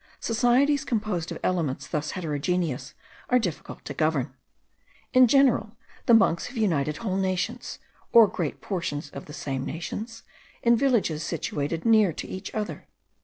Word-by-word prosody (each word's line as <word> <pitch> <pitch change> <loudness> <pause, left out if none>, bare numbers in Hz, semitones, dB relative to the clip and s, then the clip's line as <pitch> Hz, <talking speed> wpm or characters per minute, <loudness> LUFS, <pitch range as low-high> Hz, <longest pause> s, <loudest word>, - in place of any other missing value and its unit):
Societies 245 +5 +2
composed 210 -8 -2
of - - -4
elements 165 -7 -1
thus 150 0 -3
heterogeneous 155 -4 -2 0.3
are 250 - +5
difficult 180 -10 -4
to 145 - -5
govern. 145 -3 0 0.8
In 255 -1 +7
general, 235 -4 +3 0.3
the 235 - +8
monks 170 -6 +3
have 250 - -9
united 155 -8 +1
whole 190 -1 -2
nations, 185 -2 -2 0.3
or 230 -2 +8
great 170 -6 -4
portions 170 -6 -3
of - - -8
the 150 - -11
same 135 -3 -3
nations, 215 - -6 0.4
in 235 0 +5
villages 230 - +1
situated 160 0 -3
near 215 -5 +5
to - - -6
each 190 - -6
other. 210 -1 -4
185 Hz, 145 wpm, -26 LUFS, 155-230 Hz, 0.8 s, the